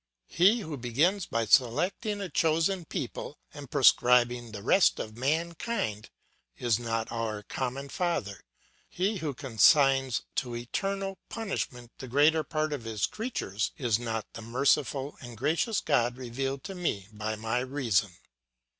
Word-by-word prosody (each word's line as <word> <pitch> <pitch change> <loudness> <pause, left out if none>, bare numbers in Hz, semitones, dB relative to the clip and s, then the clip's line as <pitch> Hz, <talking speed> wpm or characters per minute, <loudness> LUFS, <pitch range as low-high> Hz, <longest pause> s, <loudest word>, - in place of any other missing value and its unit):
He 200 +7 +4
who 160 -6 -5
begins 155 - +1
by 115 0 0
selecting 165 - +2
a 195 - -3
chosen 165 +4 +1
people, 140 +2 -5 0.2
and 145 -3 -9
proscribing 120 -2 +4
the 105 -2 -8
rest 190 - +4
of 110 0 -5
mankind, 155 - -2 0.5
is 120 -3 +1
not 115 -1 -2
our 110 -3 -3
common 130 +5 -4
father; 140 - -2 0.5
he 195 +4 -1
who 150 -6 -3
consigns 135 - +4
to 120 -3 -1
eternal 195 - -3
punishment 125 - -4
the 130 - -7
greater 150 +5 +4
part 155 -1 -1
of 140 -5 -4
his 110 -4 0
creatures, 110 - -3
is 120 -4 +1
not 115 -2 -3
the - - -8
merciful 135 +4 0
and 120 -3 -9
gracious 165 - +1
God 120 +1 +1
revealed 135 +2 -4
to 195 - -6
me 160 - -2
by 110 +1 -3
my 110 +3 -1
reason. 125 -7 +1
130 Hz, 140 wpm, -29 LUFS, 115-160 Hz, 0.5 s, He